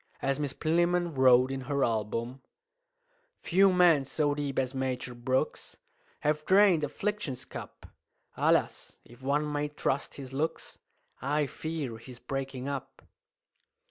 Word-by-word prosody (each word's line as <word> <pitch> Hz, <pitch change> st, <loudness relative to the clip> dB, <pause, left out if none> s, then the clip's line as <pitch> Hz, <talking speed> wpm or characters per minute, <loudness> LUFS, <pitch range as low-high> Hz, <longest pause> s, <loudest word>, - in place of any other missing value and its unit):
As 135 Hz, +1 st, -1 dB
Miss 145 Hz, -3 st, -1 dB
Plinlimmon 175 Hz, +1 st, +1 dB
wrote 130 Hz, -1 st, +5 dB
in 135 Hz, 0 st, -3 dB
her 140 Hz, -1 st, +1 dB
album 115 Hz, +3 st, -2 dB, 1.0 s
"Few 195 Hz, +2 st, +4 dB
men 175 Hz, -6 st, +5 dB
so 145 Hz, +2 st, 0 dB
deep 145 Hz, -2 st, -3 dB
as 130 Hz, 0 st, 0 dB
Major 130 Hz, -1 st, -3 dB
Brooks 130 Hz, +2 st, -2 dB, 0.4 s
Have 150 Hz, +1 st, 0 dB
drained 190 Hz, -2 st, +5 dB
affliction's 180 Hz, -2 st, -3 dB
cup. -, -, -9 dB, 0.5 s
Alas! -, -, +1 dB
if 120 Hz, +2 st, -17 dB
one 145 Hz, +3 st, 0 dB
may 145 Hz, 0 st, 0 dB
trust 145 Hz, -1 st, -2 dB
his 135 Hz, -2 st, -9 dB
looks, 155 Hz, +4 st, -3 dB, 0.4 s
I 145 Hz, +3 st, +1 dB
fear 145 Hz, -5 st, -5 dB
he's 125 Hz, +2 st, -11 dB
breaking 135 Hz, 0 st, -5 dB
up!" 135 Hz, -1 st, -6 dB
140 Hz, 130 wpm, -29 LUFS, 130-155 Hz, 1.0 s, wrote